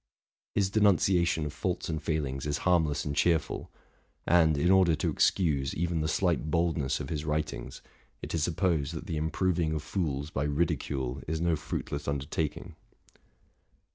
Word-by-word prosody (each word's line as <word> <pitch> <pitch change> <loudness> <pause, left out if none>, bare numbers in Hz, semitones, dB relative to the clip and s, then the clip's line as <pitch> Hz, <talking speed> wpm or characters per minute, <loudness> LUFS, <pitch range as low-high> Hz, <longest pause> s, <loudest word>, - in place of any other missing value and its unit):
His 95 -2 +2
denunciation 90 -5 +3
of 75 - -5
faults 90 +3 -2
and 80 -1 -3
failings 75 -3 -2
is 75 0 0
harmless 80 -5 +2
and 70 -1 -2
cheerful; 85 0 +1 0.6
and, 80 -3 +4
in 85 +6 +3
order 95 -4 +5
to 75 - -1
excuse 75 -8 +1
even 85 -1 -1
the 75 - 0
slight 85 -2 0
boldness 80 -4 0
of - - -5
his 75 -2 -3
writings, 75 0 -3 0.4
it - - -7
is 80 - 0
supposed 80 -3 0
that - - -6
the 80 - -3
improving 80 +1 0
of 75 -1 -3
fools 75 -5 -2
by 70 - -1
ridicule 70 -4 -1
is 80 +1 -1
no 85 0 +2
fruitless 70 -1 -4
undertaking. 70 +2 -3
80 Hz, 155 wpm, -29 LUFS, 75-85 Hz, 0.6 s, order